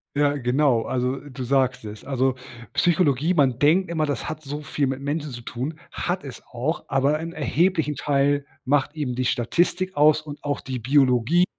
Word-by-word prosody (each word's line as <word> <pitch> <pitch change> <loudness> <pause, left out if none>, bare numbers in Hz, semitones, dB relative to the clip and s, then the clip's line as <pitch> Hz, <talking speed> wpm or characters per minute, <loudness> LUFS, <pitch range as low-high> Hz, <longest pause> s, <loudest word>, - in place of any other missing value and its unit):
Ja 145 0 +2
genau, 125 -2 +2
also 125 +1 -1
du 130 -3 -8
sagst 130 -2 +1
es. 105 0 -8
Also, 130 -1 0 0.4
Psychologie, 165 -2 +2
man 135 -6 +2
denkt 165 +5 +3
immer, 160 -2 0
das 145 -4 -3
hat 155 0 -5
so 145 +2 -5
viel 145 0 -1
mit 135 0 -2
Menschen 145 +1 -3
zu 120 - -7
tun, 130 +7 -5
hat 180 -2 -3
es 130 -4 -9
auch, 135 +8 -2
aber 140 +3 +2
im 165 0 -5
erheblichen 160 -1 +1
Teil 140 0 +1 0.2
macht 145 +2 +1
eben 140 -6 -3
die 130 - -1
Statistik 175 +10 0
aus 150 +1 +5
und 150 -1 -10
auch 145 -1 -1
die 130 -1 -5
Biologie, 135 +6 +3
145 Hz, 180 wpm, -24 LUFS, 130-155 Hz, 0.4 s, aus